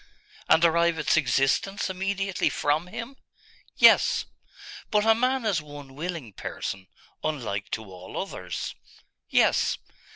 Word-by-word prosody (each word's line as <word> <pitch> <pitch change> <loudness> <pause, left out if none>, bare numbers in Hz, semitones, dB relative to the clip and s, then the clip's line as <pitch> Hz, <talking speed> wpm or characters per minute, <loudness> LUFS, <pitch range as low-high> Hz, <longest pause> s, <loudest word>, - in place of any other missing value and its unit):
'And 160 +1 +5
derive 170 0 +3
its - - +2
existence 135 - +1
immediately 195 0 -1
from 150 +4 0
Him?' 230 +8 -7 0.6
'Yes.' - - +6 0.6
'But 210 0 +2
a 225 - +7
man 255 +2 0
is 195 -7 +1
one 145 -2 -11
willing 155 - -5
person, 95 0 -5 0.4
unlike 110 -10 -3
to 110 - -3
all 95 -1 -8
others.' 90 - -5 0.6
'Yes. - - +3
160 Hz, 120 wpm, -26 LUFS, 135-195 Hz, 0.6 s, a